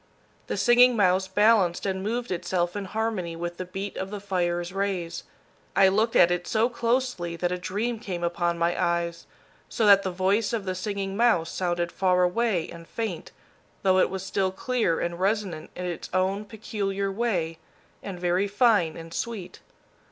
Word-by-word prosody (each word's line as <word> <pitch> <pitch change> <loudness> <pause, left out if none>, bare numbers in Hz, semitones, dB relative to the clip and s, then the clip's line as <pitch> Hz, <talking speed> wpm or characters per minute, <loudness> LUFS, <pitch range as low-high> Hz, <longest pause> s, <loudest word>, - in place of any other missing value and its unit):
The - - -2
Singing 245 +1 +6
Mouse 190 -2 +3
balanced 200 -2 +3
and 190 -1 -1
moved 235 +3 -2
itself 175 0 -1
in 205 -1 -3
harmony 195 -5 -2
with 175 +1 -5
the 185 - -4
beat 195 +3 -6
of 190 - -3
the 205 0 -5
fire's 175 -3 -1
rays. 195 -4 -2 0.5
I 195 -1 +6
looked 220 +4 +1
at 175 - +6
it 175 0 -1
so 225 +2 +2
closely 235 -7 -1
that 175 +1 -1
a 180 - -1
dream 210 +6 -2
came 180 -6 -5
upon 170 0 0
my 170 +1 +1
eyes, 170 0 -1 0.4
so 225 - 0
that 200 -1 +7
the 190 - -2
voice 195 +5 +1
of 215 -4 -2
the 185 - -1
Singing 195 +1 -3
Mouse 210 -8 +2
sounded 175 -1 -1
far 180 -1 +2
away 185 -2 +1
and 170 0 -11
faint, 215 -8 -4 0.5
though 190 -1 +4
it - - +3
was 190 0 -4
still 190 0 0
clear 220 -4 0
and 170 0 -3
resonant 190 -5 -1
in 180 - -5
its 175 -2 -5
own 190 +3 +1
peculiar 200 -2 -3
way 185 -7 -1 0.4
and 190 -3 -7
very 180 +3 +1
fine 205 -6 +3
and 165 0 -9
sweet. 220 -5 -5
190 Hz, 175 wpm, -26 LUFS, 175-210 Hz, 0.5 s, that